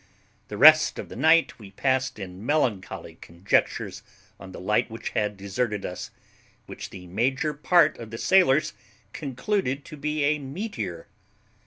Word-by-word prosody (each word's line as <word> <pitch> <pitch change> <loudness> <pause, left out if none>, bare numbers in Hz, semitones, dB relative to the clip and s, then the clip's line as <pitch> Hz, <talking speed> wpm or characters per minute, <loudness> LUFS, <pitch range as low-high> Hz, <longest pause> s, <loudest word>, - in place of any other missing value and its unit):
The - - -7
rest - - +7
of - - -7
the - - -9
night 160 +4 +3
we 105 -3 -11
passed 130 +6 -1
in 95 -1 -8
melancholy 120 -8 -2
conjectures 85 +3 -1 0.4
on 95 -1 -10
the - - -9
light 105 +3 0
which 115 +1 -6
had 105 -1 -2
deserted 100 +2 -3
us, 90 - -6 0.6
which - - -8
the 90 -2 -11
major 130 - -1
part 170 +3 +3
of 115 -2 -8
the 115 - -7
sailors 170 -2 +3 0.4
concluded 140 - -2
to - - -10
be 150 +1 -2
a 150 +1 +2
meteor. 140 - -5
125 Hz, 150 wpm, -25 LUFS, 100-150 Hz, 0.6 s, rest